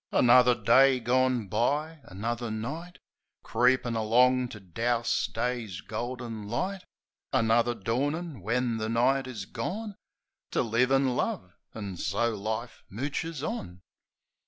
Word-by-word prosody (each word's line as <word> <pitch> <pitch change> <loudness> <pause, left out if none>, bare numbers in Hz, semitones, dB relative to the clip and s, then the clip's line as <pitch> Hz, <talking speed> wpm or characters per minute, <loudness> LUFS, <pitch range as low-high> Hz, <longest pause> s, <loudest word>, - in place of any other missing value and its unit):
Another 125 0 +6
day 130 +4 +5
gone 125 -1 +1
by; 150 - 0
another 115 +5 -4
night 145 +12 -5 0.5
Creepin' 125 -1 +2
along 125 +3 +3
to 105 - -9
douse 115 +6 0
Day's 120 -7 -3
golden 115 -1 -5
light; 185 - -2 0.5
Another 120 -1 +2
dawnin', 140 - -2
when 115 +3 0
the 110 0 -2
night 130 +3 +2
is 110 -7 -6
gone, 205 - -5 0.6
To - - +2
live 120 +3 +2
an' 135 -2 +3
love 90 -6 -2
— - - -48
an' 100 -4 -5
so 105 +9 0
life 110 +3 -4
mooches 145 - -3
on. 95 - -6
120 Hz, 125 wpm, -28 LUFS, 110-130 Hz, 0.6 s, Another